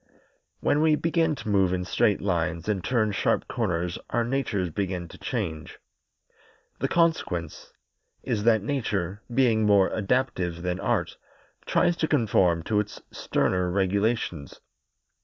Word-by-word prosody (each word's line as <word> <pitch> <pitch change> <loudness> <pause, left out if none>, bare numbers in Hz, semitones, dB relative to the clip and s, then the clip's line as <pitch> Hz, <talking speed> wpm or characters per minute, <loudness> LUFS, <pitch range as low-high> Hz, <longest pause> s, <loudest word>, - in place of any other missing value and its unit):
When 150 - +2
we 155 -1 +4
begin 165 0 +1
to 115 - -9
move 95 -3 +3
in 90 0 -1
straight 105 +2 +1
lines 85 -3 -1
and 100 -4 -1
turn 110 -4 +1
sharp 100 - 0
corners 90 -6 -2
our 120 - +1
natures 115 -8 -1
begin 90 -1 -3
to - - -13
change. 90 -11 -4 1.0
The - - 0
consequence 130 - 0 0.5
is 105 - -1
that 110 -3 +4
Nature, 105 -7 -2
being 120 -3 +3
more 100 -2 +4
adaptive 95 -6 -1
than 90 0 -2
Art, - - -1 0.5
tries 175 - +2
to 160 - 0
conform 100 - +2
to 105 +3 +1
its 105 0 -4
sterner 90 -1 0
regulations. 100 - -1
100 Hz, 135 wpm, -26 LUFS, 90-120 Hz, 1.0 s, we